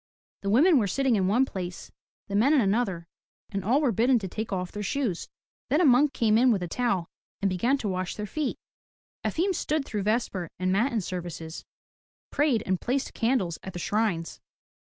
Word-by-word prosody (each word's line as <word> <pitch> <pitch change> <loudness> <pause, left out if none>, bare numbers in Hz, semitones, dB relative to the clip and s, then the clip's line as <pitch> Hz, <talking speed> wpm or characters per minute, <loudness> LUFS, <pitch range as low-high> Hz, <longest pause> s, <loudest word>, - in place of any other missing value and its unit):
The 200 - -2
women 290 - +5
were 210 - +1
sitting 265 +4 +1
in 190 -3 +1
one 240 +7 +3
place, 180 -7 -6 0.4
the 200 - -7
men 245 +9 +4
in 275 - +5
another 195 -5 0 0.5
and 195 -2 -3
all 245 +8 +3
were 275 -5 +2
bidden 240 +5 +3
to 200 -4 -3
take 215 +4 -5
off 180 -2 -2
their 210 - -5
shoes. 210 -3 -2 0.4
Then 295 - +3
a 360 - +4
monk 275 +2 +5
came 220 -3 +3
in 250 0 +5
with 195 -5 0
a - - -3
towel 195 -4 -1 0.3
and 200 - +1
began 235 +10 +1
to 225 - -4
wash 185 -1 -2
their 210 - -4
feet. 290 +7 -2 0.7
Efim 375 +4 0
stood 310 -4 -1
through 210 -5 -3
vesper 205 -5 -1
and 185 +1 0
matin 225 +3 +1
services, 175 -3 -6 0.7
prayed 285 -6 +2
and 185 -1 -1
placed 265 +2 -1
candles 225 -8 0
at 190 - -8
the - - -6
shrines. 200 -4 -1
215 Hz, 195 wpm, -27 LUFS, 185-260 Hz, 0.7 s, women